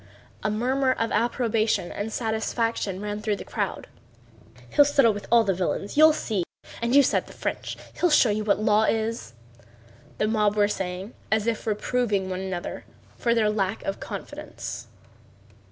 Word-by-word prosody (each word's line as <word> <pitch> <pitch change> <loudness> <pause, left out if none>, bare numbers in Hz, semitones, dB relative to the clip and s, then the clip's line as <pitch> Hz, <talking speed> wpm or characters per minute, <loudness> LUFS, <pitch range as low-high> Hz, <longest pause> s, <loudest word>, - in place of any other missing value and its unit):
A 215 - 0
murmur 260 +5 +1
of 230 -2 -2
approbation 225 -3 +1
and 215 +2 -4
satisfaction 220 -3 -1
ran 210 0 -4
through 210 -1 0
the - - -9
crowd. - - -3 0.9
"He'll 290 - +7
settle 275 -6 +4
with 205 -1 -7
all 235 -1 +6
the 195 -3 +1
villains, 185 +2 -2
you'll 310 +2 +8
see! 215 - -1 0.4
And 235 +3 +1
you 285 - +8
said - - +1
the - - -12
French... - - -4 0.2
He'll 355 - +4
show 265 -7 +5
you 215 +1 -1
what 210 -1 +2
law 215 0 +3
is!" 225 - -1 0.8
the 215 - +1
mob 210 -1 +2
were 205 -1 +4
saying 190 +1 -4 0.2
as 220 -1 +2
if 230 -1 -2
reproving 210 -3 0
one 185 - -3
another 190 -2 -5 0.3
for 235 -1 +1
their 215 -2 +3
lack 200 -1 -1
of 195 - -3
confidence. - - -7
215 Hz, 165 wpm, -25 LUFS, 205-235 Hz, 0.9 s, you'll